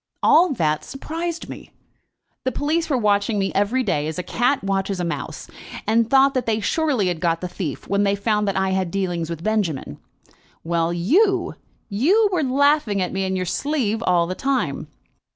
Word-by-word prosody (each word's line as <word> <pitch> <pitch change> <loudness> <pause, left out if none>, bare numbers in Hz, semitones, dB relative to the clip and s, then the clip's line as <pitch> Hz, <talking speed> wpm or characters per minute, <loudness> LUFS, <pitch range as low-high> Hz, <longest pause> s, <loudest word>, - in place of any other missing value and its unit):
"All 345 +1 +5
that 155 - 0
surprised 330 +4 -5
me. - - -10 0.7
The 260 - 0
police 315 +6 -1
were 275 - +2
watching 210 -1 +1
me 195 -1 0
every 215 +6 +1
day 150 -9 0
as 160 - -4
a 180 - -3
cat 245 +6 0
watches 195 -1 -1
a - - -1
mouse, 170 - -5 0.4
and 225 +1 +2
thought 275 0 +5
that 255 -3 -2
they 220 -1 +1
surely 260 - 0
had 175 -2 -3
got 165 -1 0
the 180 - -4
thief 175 -5 -5
when 200 +1 +1
they 200 0 +2
found 210 0 0
that 195 - 0
I 190 0 +1
had 190 -2 0
dealings 175 -3 -2
with 165 -1 -6
Benjamin. 190 - -1 0.6
Well; 165 0 0
you 345 - +2 0.3
you 350 - +3
were 350 - +1
laughing 280 -5 +2
at 180 - -2
me 195 0 -1
in 190 0 -1
your 185 0 -1
sleeve 230 - -1
all 180 -6 +2
the 180 - -3
time." 270 +6 -1
205 Hz, 190 wpm, -22 LUFS, 180-270 Hz, 0.7 s, All